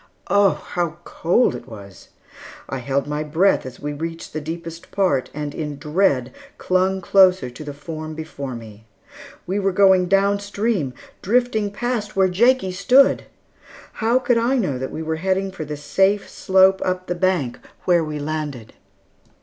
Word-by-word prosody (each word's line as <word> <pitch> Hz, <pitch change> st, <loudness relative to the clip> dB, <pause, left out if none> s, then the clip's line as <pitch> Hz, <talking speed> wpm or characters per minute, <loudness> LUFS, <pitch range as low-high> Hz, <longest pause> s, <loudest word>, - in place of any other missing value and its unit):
Oh, 200 Hz, -1 st, +3 dB
how 170 Hz, -2 st, -2 dB
cold 175 Hz, -, +1 dB
it 125 Hz, -, -8 dB
was! 100 Hz, -4 st, -12 dB, 0.6 s
I 135 Hz, -, -4 dB
held 135 Hz, +2 st, -1 dB
my 150 Hz, +1 st, -3 dB
breath 160 Hz, 0 st, +2 dB
as 125 Hz, -, -10 dB
we 145 Hz, 0 st, -4 dB
reached 165 Hz, +2 st, -6 dB
the 155 Hz, -, -3 dB
deepest 165 Hz, +2 st, -7 dB
part, 180 Hz, -10 st, +1 dB
and 150 Hz, -1 st, -5 dB
in 150 Hz, -3 st, -5 dB
dread 145 Hz, -4 st, +1 dB, 0.2 s
clung 190 Hz, +1 st, +1 dB
closer 185 Hz, -8 st, +4 dB
to 125 Hz, +5 st, -9 dB
the 145 Hz, -, -6 dB
form 155 Hz, +2 st, -7 dB
before 140 Hz, -5 st, -6 dB
me. 110 Hz, -2 st, -11 dB, 0.6 s
We 190 Hz, +3 st, -1 dB
were 195 Hz, -1 st, +1 dB
going 190 Hz, -1 st, +4 dB
down 200 Hz, +2 st, +3 dB
stream, 200 Hz, -, -2 dB, 0.3 s
drifting 220 Hz, -1 st, +1 dB
past 215 Hz, 0 st, -3 dB
where 190 Hz, -1 st, +3 dB
Jakie 225 Hz, +1 st, +3 dB
stood! 250 Hz, +9 st, +4 dB, 0.8 s
How 230 Hz, +3 st, +3 dB
could 245 Hz, -2 st, +2 dB
I 240 Hz, +4 st, +1 dB
know 150 Hz, -, -1 dB
that 130 Hz, -, -3 dB
we 160 Hz, -, -5 dB
were 160 Hz, 0 st, -2 dB
heading 190 Hz, +2 st, -1 dB
for 175 Hz, -5 st, -6 dB
the 150 Hz, 0 st, -5 dB
safe 190 Hz, +8 st, +1 dB
slope 190 Hz, 0 st, +3 dB
up 185 Hz, 0 st, -2 dB
the 180 Hz, -, -2 dB
bank 175 Hz, -8 st, 0 dB, 0.3 s
where 175 Hz, -2 st, +3 dB
we 155 Hz, -1 st, -4 dB
landed? 145 Hz, -6 st, -5 dB
175 Hz, 165 wpm, -21 LUFS, 145-195 Hz, 0.8 s, closer